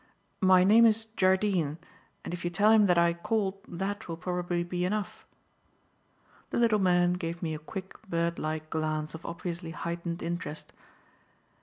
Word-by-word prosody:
"My 185 -1 +6
name 225 +4 +7
is 225 0 +2
Jardine, 185 -5 +2 0.5
and - - -5
if 175 - -5
you 175 - 0
tell 205 +5 +3
him 215 -2 +6
that 180 -1 +3
I 170 0 +4
called 195 +2 -1
that 195 +4 -4
will 165 -1 -5
probably 175 0 -2
be 175 0 -3
enough." 205 +2 -3 1.2
The - - -2
little 230 -3 +3
man 180 -2 +3
gave 170 -1 -4
me 160 -2 -1
a 155 - -5
quick, 190 +4 -8
bird 170 0 0
like 155 0 -4
glance 155 -1 -2
of 160 +1 -9
obviously 170 0 -5
heightened 170 +2 -4
interest. 170 -2 -5
175 Hz, 160 wpm, -29 LUFS, 170-190 Hz, 1.2 s, name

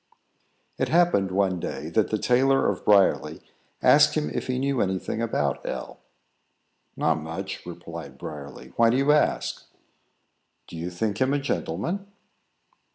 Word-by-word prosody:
It - - 0
happened, 170 - +3
one 95 -1 +1
day, - - -5
that - - +1
the - - 0
tailor 135 +2 +3
of 100 - -2
Briarly 100 -2 +3 0.4
asked 150 +1 +6
him 155 -1 -1
if - - -3
he 130 -1 -1
knew 135 -1 0
any 95 -1 0
thing 110 - -4
about 75 - -1
L. - - -6 1.0
"Not 80 0 +1
much," 80 +5 -6
replied 85 -1 -8
Briarly. 70 -3 -9
"Why 115 0 +5
do 120 - +2
you 140 +2 +3
ask?" 150 - +1 1.0
"Do - - -11
you 85 +2 -4
think 100 +4 -3
him 130 +2 +3
a - - +1
gentleman?" 180 +7 -3
105 Hz, 150 wpm, -25 LUFS, 85-135 Hz, 1.0 s, asked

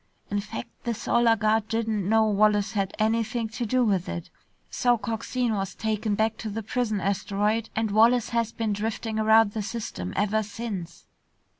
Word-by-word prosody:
In 205 - +1
fact, 200 - -6
the 235 -1 -1
Solar 235 +1 +3
Guard 215 0 +1
didn't 220 -4 -1
know 220 0 +5
Wallace 210 0 +3
had 200 -3 -2
anything 225 +1 0
to 230 +1 -4
do 255 +2 +2
with 190 -5 0
it. 170 -1 -6 0.4
So 245 -1 +2
Coxine 230 +1 -2
was 195 -2 -3
taken 215 -1 -1
back 220 +1 0
to 220 - -5
the 220 +2 -4
prison 220 -1 -1
asteroid, 205 +3 0
and 220 -1 0
Wallace 230 +3 +4
has 230 -1 0
been 225 -2 -2
driftin' 220 +1 -3
around 220 -1 +5
the 215 - -3
system 205 - -5
ever 210 +2 +2
since." 205 -5 -6
220 Hz, 170 wpm, -26 LUFS, 205-230 Hz, 0.4 s, know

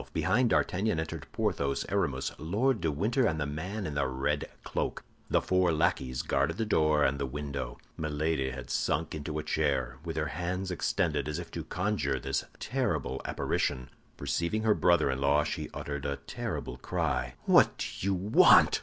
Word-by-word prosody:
Behind 100 +10 +2
D'Artagnan 100 -3 +1
entered 80 - -5
Porthos, 70 -1 0
Aramis, - - 0
Lord 105 - +1
de 80 - +1
Winter, 115 - +1
and 80 -5 -1
the 75 - 0
man 90 +9 -4
in 75 - -3
the 70 - +1
red 70 +3 -1
cloak. - - -2 0.3
The - - +2
four 90 -1 +3
lackeys 65 -5 0
guarded 70 +1 +1
the 115 - 0
door 75 -7 +3
and 70 0 +2
the 70 - -1
window. 70 -3 -4 0.2
Milady 75 -2 0
had 65 -1 -7
sunk 80 +1 0
into 75 0 -4
a 75 - -2
chair, 65 -4 0
with 80 -2 -5
her 80 0 0
hands 90 +3 -3
extended, 85 -4 0
as 75 0 -2
if 85 -1 -7
to 85 - -4
conjure 80 -7 -1
this - - -1 0.2
terrible 110 - -1
apparition. 65 0 -1 0.3
Perceiving 95 +6 -1
her 110 -1 +5
brother 85 -8 +3
in 65 +1 -3
law, 70 +2 +4
she 75 0 -3
uttered 70 -1 -4
a 70 - -1
terrible - - -5
cry. 65 0 -1
"What - - +5
do - - -2 0.2
you 100 - +2
want?" 95 +4 +6
75 Hz, 175 wpm, -30 LUFS, 70-90 Hz, 0.3 s, want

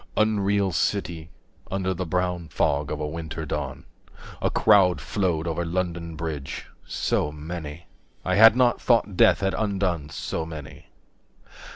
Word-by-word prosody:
Unreal 100 -2 +2
City, 85 -2 -1 0.4
60 - - -28
Under 95 -1 0
the 90 0 -4
brown 90 0 -1
fog 70 -1 0
of 75 - -3
a 75 - -2
winter 80 0 -5
dawn, - - -4 0.6
A - - +2
crowd 95 -4 +4
flowed 90 -6 -1
over 85 0 -1
London 85 -1 -3
Bridge, 75 -4 -5 0.2
so 75 - 0
many, 75 +1 -7 0.4
I 95 - +1
had 110 +3 +8
not 125 -1 +3
thought 115 -5 +2
death 95 - +5
had 95 0 +1
undone 95 -8 -1
so 80 - -3
many. 80 -4 -9
85 Hz, 145 wpm, -25 LUFS, 80-100 Hz, 0.6 s, had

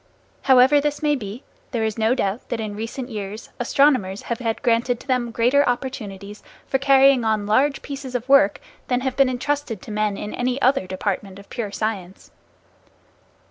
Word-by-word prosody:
However 265 +3 +6
this 295 +1 -2
may 295 -1 +3
be, 220 0 -7 0.3
there 235 -4 -2
is 220 -1 -1
no 225 +2 +2
doubt 200 -2 -2
that 240 - -2
in 215 -2 -4
recent 230 +4 -5
years 210 -1 -6
astronomers 245 -6 +2
have 235 - -3
had 230 +1 -3
granted 240 0 +1
to - - -14
them 250 -3 0
greater 245 +5 +3
opportunities 215 -6 -5 0.2
for 270 - 0
carrying 275 -2 +5
on 220 -2 0
large 270 +7 +2
pieces 275 -3 -7
of 250 0 -3
work 270 -8 +5 0.3
than 250 0 0
have 260 -1 -2
been 275 -1 +4
entrusted 255 -3 -2
to - - -9
men 210 -1 -1
in 210 - -6
any 250 +1 -1
other 260 -6 +2
department 190 0 -3
of 200 - -15
pure 225 -5 -4
science. 200 -3 -4
240 Hz, 180 wpm, -22 LUFS, 210-265 Hz, 0.3 s, However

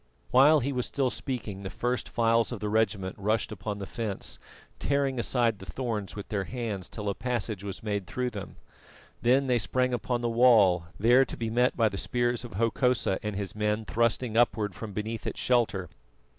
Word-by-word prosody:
While 145 +4 +6
he 140 +3 -1
was 125 -2 -1
still 135 -3 0
speaking 115 -8 -4
the 95 - -5
first 125 +4 -2
files 115 0 +2
of 120 - -4
the 105 - -2
regiment 105 -3 0
rushed 110 +3 0
upon 105 0 -4
the 100 - -5
fence, 110 -2 -3 0.4
tearing 140 -2 0
aside 120 -3 +1
the 95 - -9
thorns 110 +1 -3
with 100 - -7
their 100 -2 -1
hands 110 -7 -4
till 105 -2 -6
a 100 - +1
passage 115 -3 -3
was 100 0 -6
made 100 -4 -2
through 125 +3 -2
them. 100 -3 -7 0.7
Then 130 +3 +4
they 125 -2 +2
sprang 125 +6 +1
upon 120 +1 -1
the 120 - 0
wall, 115 -8 +5
there 120 +5 +6
to - - -8
be 115 -1 -3
met 125 +2 +2
by 115 -2 +4
the 100 -2 -3
spears 120 0 0
of 120 - -9
Hokosa 115 -1 +1
and 105 -1 -3
his 100 -1 -3
men 105 +1 -1
thrusting 115 0 0
upward 110 -4 +2
from 105 +2 -7
beneath 110 +2 -4
its - - -4
shelter. 115 -7 +1
115 Hz, 195 wpm, -28 LUFS, 100-125 Hz, 0.7 s, While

